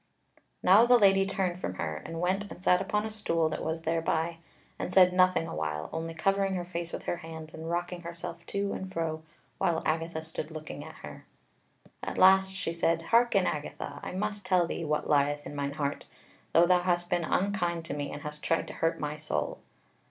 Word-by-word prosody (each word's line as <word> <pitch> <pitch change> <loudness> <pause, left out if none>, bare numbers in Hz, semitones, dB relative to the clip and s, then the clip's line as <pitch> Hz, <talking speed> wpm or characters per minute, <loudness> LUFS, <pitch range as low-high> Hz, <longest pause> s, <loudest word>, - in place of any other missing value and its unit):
Now 205 +6 +7
the 245 0 +7
Lady 195 -3 +5
turned 185 -2 -1
from 95 - -3
her, 80 -3 -3
and 165 - -6
went 190 +3 0
and 180 - -11
sat 180 -1 +4
upon 210 +2 0
a 220 - -4
stool 165 -7 +1
that 155 - -4
was 160 +1 -3
thereby, 165 0 0 0.4
and - - -3
said 180 -1 +6
nothing 185 -2 +4
a - - -6
while; 75 0 -3
only 165 0 -4
covering 195 +3 +1
her 175 -1 -3
face 170 -1 -5
with - - -6
her 175 - -1
hands 160 -1 -9
and 160 +1 -6
rocking 175 +1 -2
herself 170 0 -7
to 200 0 -1
and 190 0 -5
fro, 160 -3 -2 0.4
while 165 -1 +1
Agatha 160 0 -1
stood 160 -1 -5
looking 155 -1 -7
at - - -10
her. - - -10 0.7
At - - -5
last 190 +1 +6
she 190 -3 -3
said: 165 0 +1
"Hearken, 230 -1 +4
Agatha, 150 -1 -4
I - - -6
must 205 +2 -3
tell 185 -2 +3
thee 170 - -4
what 150 0 -1
lieth 145 0 +2
in 145 - -7
mine 140 0 -2
heart, 145 -1 -2 0.5
though 170 - +6
thou 180 0 +4
hast 175 0 0
been 175 -1 +2
unkind 175 -2 0
to 160 - -4
me 145 -1 -3
and 145 - -7
hast 150 0 -6
tried 165 - +1
to - - -7
hurt 165 0 0
my 150 0 -3
soul. 75 - -2
170 Hz, 205 wpm, -29 LUFS, 160-185 Hz, 0.7 s, Now